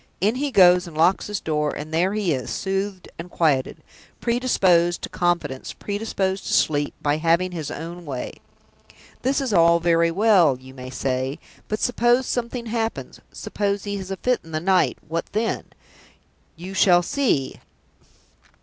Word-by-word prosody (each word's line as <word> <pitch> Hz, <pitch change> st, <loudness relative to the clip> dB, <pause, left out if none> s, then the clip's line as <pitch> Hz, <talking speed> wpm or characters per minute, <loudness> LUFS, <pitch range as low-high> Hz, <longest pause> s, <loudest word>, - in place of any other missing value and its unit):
In 210 Hz, +4 st, +2 dB
he 280 Hz, +3 st, -2 dB
goes, 180 Hz, -5 st, +5 dB
and 160 Hz, -2 st, -10 dB
locks 170 Hz, +4 st, +3 dB
his 210 Hz, -2 st, -3 dB
door; 150 Hz, -1 st, -1 dB
and 155 Hz, +2 st, -7 dB
there 180 Hz, +4 st, +2 dB
he 200 Hz, -6 st, +1 dB
is, 130 Hz, -2 st, -4 dB
soothed 195 Hz, -1 st, -3 dB
and 170 Hz, +1 st, -7 dB
quieted, 150 Hz, -7 st, 0 dB, 0.4 s
predisposed 190 Hz, -8 st, +2 dB
to -, -, -4 dB
confidence, 170 Hz, -7 st, -1 dB
predisposed 200 Hz, -2 st, -3 dB
to -, -, -1 dB
sleep, 145 Hz, -1 st, +1 dB
by 145 Hz, 0 st, +1 dB
having 170 Hz, +3 st, +1 dB
his 160 Hz, -5 st, -5 dB
own 170 Hz, +3 st, -7 dB
way. 135 Hz, -5 st, -5 dB, 0.9 s
'This 270 Hz, +2 st, +1 dB
is 260 Hz, -5 st, -2 dB
all 170 Hz, -1 st, +5 dB
very 170 Hz, 0 st, +3 dB
well,' 180 Hz, -, +4 dB
you 130 Hz, 0 st, -13 dB
may 130 Hz, -1 st, -9 dB
say; 130 Hz, +1 st, -2 dB, 0.3 s
'but 215 Hz, -, -2 dB
suppose 245 Hz, +1 st, +2 dB
something 240 Hz, 0 st, -3 dB
happens, 225 Hz, 0 st, -3 dB
suppose 200 Hz, -1 st, -2 dB
he 205 Hz, -1 st, -3 dB
has 190 Hz, -1 st, -7 dB
a 195 Hz, -, -4 dB
fit 250 Hz, +3 st, +1 dB
in 160 Hz, -, -13 dB
the 155 Hz, -, 0 dB
night, 185 Hz, +2 st, +2 dB
what 165 Hz, +1 st, -3 dB
then?' 220 Hz, +2 st, -1 dB, 0.9 s
You 180 Hz, +3 st, -8 dB
shall 175 Hz, -2 st, +4 dB
see! 245 Hz, -, 0 dB
180 Hz, 160 wpm, -23 LUFS, 160-210 Hz, 0.9 s, goes